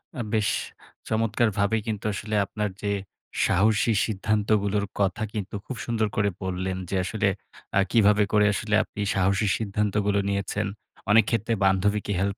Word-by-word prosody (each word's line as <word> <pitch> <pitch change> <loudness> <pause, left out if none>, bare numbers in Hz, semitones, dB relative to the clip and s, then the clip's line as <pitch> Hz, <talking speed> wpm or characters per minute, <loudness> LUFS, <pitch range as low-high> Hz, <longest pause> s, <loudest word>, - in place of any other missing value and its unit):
আ 125 - -3
বেশ, 110 0 +2 0.6
চমৎকারভাবেই 110 -1 +1
কিন্তু 105 -2 -3
আসলে 105 +2 -3
আপনার 105 +1 -3
যে, 100 - 0 0.5
সাহসী 110 +4 +3
সিদ্ধান্তগুলোর 105 -1 0
কথা 100 +3 +1
কিন্তু 105 -1 -4
খুব 130 - -5
সুন্দর 115 -2 0
করে 100 0 +2
বললেন 95 0 -2
যে, - - -2
আসলে 100 +2 0 0.5
আ - - +6
কীভাবে 105 -2 +5
করে 105 0 +5
আসলে 110 +1 0
আপনি 105 - -8
সাহসী 95 +2 +2
সিদ্ধান্তগুলো 105 -1 0
নিয়েছেন, 100 +1 -1 0.4
অনেক 110 -1 +6
ক্ষেত্রে 115 0 0
বান্ধবীকে 100 +2 +1
হেল্প 100 +1 -1
105 Hz, 140 wpm, -25 LUFS, 100-110 Hz, 0.6 s, আ